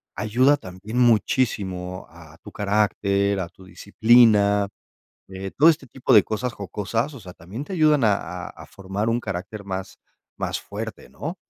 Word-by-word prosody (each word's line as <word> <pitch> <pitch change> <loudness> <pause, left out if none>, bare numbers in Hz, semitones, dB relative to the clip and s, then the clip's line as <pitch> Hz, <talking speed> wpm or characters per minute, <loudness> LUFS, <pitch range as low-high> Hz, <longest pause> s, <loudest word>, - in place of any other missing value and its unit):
ayuda 120 +8 +3
también 100 +2 -6
muchísimo 100 -6 +1
a 85 -1 -15
tu - - -10
carácter, 100 -1 +1
a 85 -2 -4
tu 95 - -18
disciplina. 105 0 +4 0.7
Eh, 95 0 -6
todo 155 +4 +7
este 150 -5 0
tipo 125 +2 0
de 105 - +8
cosas 115 +3 -3
jocosas, 105 - -3
o 135 - -10
sea, 90 - -10
también 95 - -8
te 190 - -7
ayudan 155 -5 +3
a 105 -2 +4 0.3
a - - -8
a - - -13
formar 100 +2 -4
un 115 - +1
carácter 100 0 -6
más 95 -1 -6 0.4
más - - -2
fuerte, 110 +2 -7
¿no? 165 +5 -6
105 Hz, 160 wpm, -23 LUFS, 95-120 Hz, 0.7 s, de